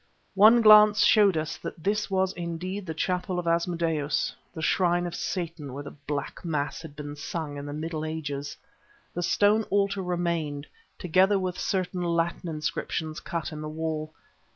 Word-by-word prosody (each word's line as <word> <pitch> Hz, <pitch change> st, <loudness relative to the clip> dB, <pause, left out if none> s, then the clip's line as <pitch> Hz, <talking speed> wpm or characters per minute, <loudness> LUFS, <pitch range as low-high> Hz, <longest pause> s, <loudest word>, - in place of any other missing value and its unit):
One 220 Hz, +4 st, +7 dB
glance 210 Hz, -1 st, +8 dB
showed 205 Hz, -6 st, +5 dB
us 155 Hz, 0 st, -3 dB
that 160 Hz, -, -8 dB
this 210 Hz, +1 st, 0 dB
was 190 Hz, -1 st, +1 dB
indeed 180 Hz, +3 st, -5 dB
the 160 Hz, -, -3 dB
chapel 180 Hz, +2 st, -1 dB
of 175 Hz, -, -2 dB
Asmodeus, 165 Hz, -3 st, 0 dB, 0.2 s
the -, -, -9 dB
shrine 175 Hz, +1 st, +2 dB
of 175 Hz, -, -4 dB
Satan 165 Hz, -7 st, -4 dB
where 140 Hz, +2 st, -6 dB
the 145 Hz, -, -8 dB, 0.2 s
Black 145 Hz, -1 st, -4 dB
Mass 150 Hz, -4 st, -2 dB
had 160 Hz, -3 st, -10 dB
been 145 Hz, 0 st, -7 dB
sung 150 Hz, 0 st, -5 dB
in 145 Hz, 0 st, -6 dB
the -, -, -5 dB
Middle 155 Hz, +1 st, -4 dB
Ages. 145 Hz, -3 st, -4 dB, 0.6 s
The 175 Hz, -, -3 dB
stone 205 Hz, +4 st, +3 dB
altar 200 Hz, 0 st, +1 dB
remained, 170 Hz, -5 st, -2 dB, 0.3 s
together 185 Hz, +3 st, +3 dB
with 185 Hz, -1 st, -3 dB
certain 185 Hz, -1 st, -1 dB
Latin 170 Hz, 0 st, -1 dB
inscriptions 155 Hz, 0 st, -3 dB
cut 170 Hz, -5 st, -4 dB
in 155 Hz, -1 st, -6 dB
the 155 Hz, -, -5 dB
wall. 155 Hz, 0 st, -3 dB
170 Hz, 165 wpm, -27 LUFS, 155-185 Hz, 0.6 s, glance